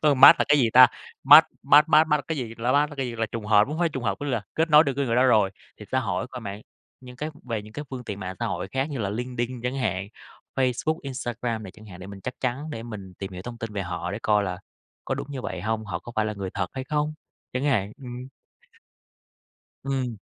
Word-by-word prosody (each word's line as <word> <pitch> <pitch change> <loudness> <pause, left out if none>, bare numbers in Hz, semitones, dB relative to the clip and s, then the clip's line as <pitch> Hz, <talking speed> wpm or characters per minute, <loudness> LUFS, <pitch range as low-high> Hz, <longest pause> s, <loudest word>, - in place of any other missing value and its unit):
ơ, 150 -2 +4
match 135 0 +9
là - - +3
cái 150 - +5
gì 120 -4 +3
ta? 130 0 +10 0.4
match 150 +3 +10 0.2
match 145 +2 +6
match 155 0 +6
match 150 -1 +3
là - - -13
cái 160 -2 -2
gì? 115 -3 -5
Là 120 +2 +1
Match 145 +2 +3
là 145 - -10
cái 135 -2 -2
gì? 120 - -6
Là 115 0 0
trùng 110 -1 -6
hợp 105 -1 +5
hông 155 - -4
phải 175 -1 +2
trùng 135 -5 -5
hợp 100 -2 0
có 145 - -3
nghĩa 140 - -1
là 110 -4 -1
kết 160 +1 +1
nối 150 +1 +8
được 140 - 0
cái 140 - +1
người 115 - 0
đó 125 - +5
rồi. 105 -6 +4 0.3
Thì 105 - -9
xã 130 - +2
hội 95 -5 -2
coi 125 -1 -8
mạng 100 -2 -6 0.4
những 125 -1 -12
cái 150 +5 -4
về 115 -4 -3
những 105 - -13
cái 150 - -6
phương 125 -2 -6
tiện 100 -2 -6
mạng 95 -1 -5
xã - - -1
hội - - -3
khác 135 +3 -2
như 140 - -4
là 100 - -1
LinkedIn 125 +2 -3
chẳng 125 +2 -2
hạn, 100 -7 -2 0.5
Facebook, 135 +5 0
Instagram 120 -4 -4
này 95 - -8
chẳng 110 +1 -15
hạn 90 -2 -11
để 95 - -8
mình 100 -1 -10
chắc 125 - -5
chắn 135 +5 -2
để 115 -6 -6
mình 100 -5 -9
tìm 95 -1 -6
hiểu 90 0 -7
thông 120 +1 -8
tin 115 -2 -5
về 100 -1 -2
họ 90 -1 -4
để 105 - -3
coi 105 -1 +3
là 90 -2 -4 0.5
có - - -1
đúng - - -5
như 135 - -5
vậy 90 - -4
hông, 110 +3 -2
họ 85 -4 -3
có 120 +6 -11
phải 110 - +2
là 110 - -2
người 100 -2 -5
thật 100 - -1
hay 130 -1 -5
không 150 +2 -1 0.4
chẳng 125 +2 -2
hạn. 110 -8 +1
Ừm. 125 0 -7 1.6
Ừm. 130 -5 -2
120 Hz, 275 wpm, -25 LUFS, 105-135 Hz, 1.6 s, ta